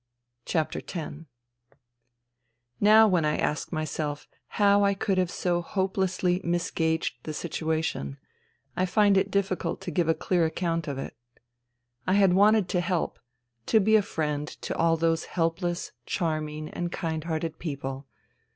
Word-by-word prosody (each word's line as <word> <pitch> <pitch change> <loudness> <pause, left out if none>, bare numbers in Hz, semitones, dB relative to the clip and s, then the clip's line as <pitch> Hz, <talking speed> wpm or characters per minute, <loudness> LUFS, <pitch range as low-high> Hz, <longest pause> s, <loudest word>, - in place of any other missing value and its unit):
X 160 -2 0 2.0
Now 215 +2 +7
when 180 -5 +2
I 150 0 +1
ask 150 - -1
myself 155 -2 -3 0.3
how 205 -1 +5
I 200 0 +3
could 195 -1 0
have 180 -2 +1
so 175 -1 0
hopelessly 185 -1 0
misgauged 165 -5 -1
the 155 +3 -6
situation, 160 - -2 0.6
I 185 - +1
find 205 +1 +4
it 195 +1 +2
difficult 195 -2 -1
to 175 - -5
give 165 +1 +1
a 165 - +4
clear 175 +2 +1
account 165 0 -1
of 140 -2 -3
it. 135 - -6 0.9
I 185 - +3
had 195 -2 +5
wanted 205 +1 +5
to 180 - +1
help, 175 -1 -1 0.5
to 220 - +5
be 215 +2 +4
a 215 - +6
friend 150 -6 -2
to - - -6
all 165 0 +3
those 165 0 +1
helpless, 175 +1 -1 0.2
charming 155 -2 -2
and 175 0 -4
kind 160 -2 -3
hearted 160 -1 -3
people. 140 -3 -5
170 Hz, 140 wpm, -27 LUFS, 155-190 Hz, 2.0 s, Now